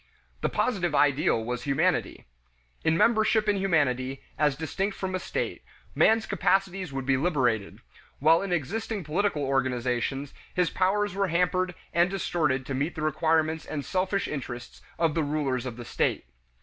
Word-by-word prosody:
The - - +1
positive 180 -10 0
ideal 135 -5 +3
was 125 +1 -3
humanity. 155 +6 0 0.6
In 160 +1 +2
membership 220 0 +3
in 205 -1 +3
humanity, 135 -8 0
as 150 -2 +2
distinct 190 +7 -3
from 190 -1 -3
a 185 - 0
state, - - -3 0.3
man's 225 0 +4
capacities 190 -2 0
would 135 -1 -4
be 135 0 +3
liberated; 130 - 0 0.4
while 160 +4 +4
in 195 -1 -4
existing 200 - -2
political 160 0 0
organizations 130 0 -1 0.2
his 180 -2 +2
powers 205 +2 +1
were 195 0 0
hampered 180 +1 +1 0.2
and 170 +2 +4
distorted 155 -8 0
to 135 - -4
meet 140 +6 -1
the 155 - -4
requirements 160 +1 +1
and 145 -2 -5
selfish 190 +1 0
interests 120 -4 -6 0.2
of 165 -2 +2
the 165 - +1
rulers 140 -4 -1
of 120 -2 -6
the 120 - -7
state. - - -1
160 Hz, 155 wpm, -27 LUFS, 135-185 Hz, 0.6 s, man's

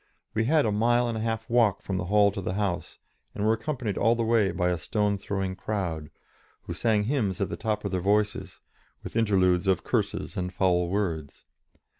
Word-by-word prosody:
We 110 +1 +1
had 150 +2 +3
a 110 - +1
mile 120 +3 +2
and 115 - -2
a 110 - -3
half 115 0 -2
to 115 - -8
walk 115 -5 +3
from 95 - -2
the 90 - -2
hall 100 +2 +4
to 100 0 -5
the 95 0 -3
house, 100 -4 -2 0.4
and 105 - -1
were 110 - +4
accompanied 115 -2 -3
all 115 +1 +4
the 115 - -1
way 110 -3 +3
by 90 0 0
a 90 - 0
stone 105 +3 0
throwing 95 -1 -3
crowd, 85 -8 -3 0.5
who - - -5
sang 110 -3 +1
hymns 105 -6 -1
at 100 - -1
the - - -3
tops 105 -1 -2
of 100 - -2
their 90 -1 -1
voices, 105 +2 0 0.4
with - - -8
interludes 95 -4 +2
of 95 -2 +2
curses - - -2
and 90 0 -2
foul 90 -2 +2
words. 85 -7 -3
100 Hz, 210 wpm, -27 LUFS, 95-110 Hz, 0.5 s, hall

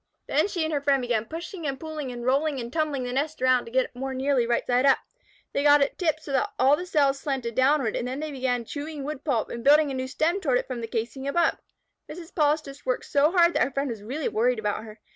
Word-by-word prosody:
Then - - +2
she 355 -5 -2
and 315 0 -2
her 285 - 0
friend 280 -1 +3
began 240 -3 -1
pushing 330 - -6
and 270 -1 -3
pulling 310 -4 -5
and 240 -1 -7
rolling 275 +2 +1
and 235 0 -6
tumbling 305 -5 -1
the 245 0 -4
nest 295 +4 -2
around 255 -1 +3
to 230 - -10
get 260 +1 +2
it - - -15
more 265 +1 -4
nearly 260 -2 +1
right 235 0 0
side 250 +1 +2
up. 275 -1 +5 0.6
They - - +1
got 290 0 +6
it 280 - -4
tipped 315 -3 0
so 285 - -7
that 415 +10 +1
all 270 +3 +5
the 360 +4 -6
cells 280 -4 +2
slanted 265 -5 -3
downward, 260 -2 +2
and 245 - -2
then 260 +2 -4
they 310 0 -4
began 250 -3 -1
chewing 290 +2 -6
wood 290 -1 -5
pulp 250 -8 -1
and 235 - -6
building 295 +1 +5
a - - -3
new 260 0 -3
stem 330 +8 0
toward 270 -8 +2
it - - -2
from 250 -3 -5
the 230 - -4
casing 235 +4 -4
above. 335 +4 +1 0.5
Mrs. 335 +1 -9
Polistes 300 -2 0
worked - - -1
so 290 +1 +3
hard 345 -2 +4
that - - +1
her - - 0
friend 275 -1 -2
was 220 -3 -7
really 270 +8 -3
worried 245 +3 +1
about 210 0 -2
her. 215 -1 -12
275 Hz, 260 wpm, -26 LUFS, 250-305 Hz, 0.6 s, got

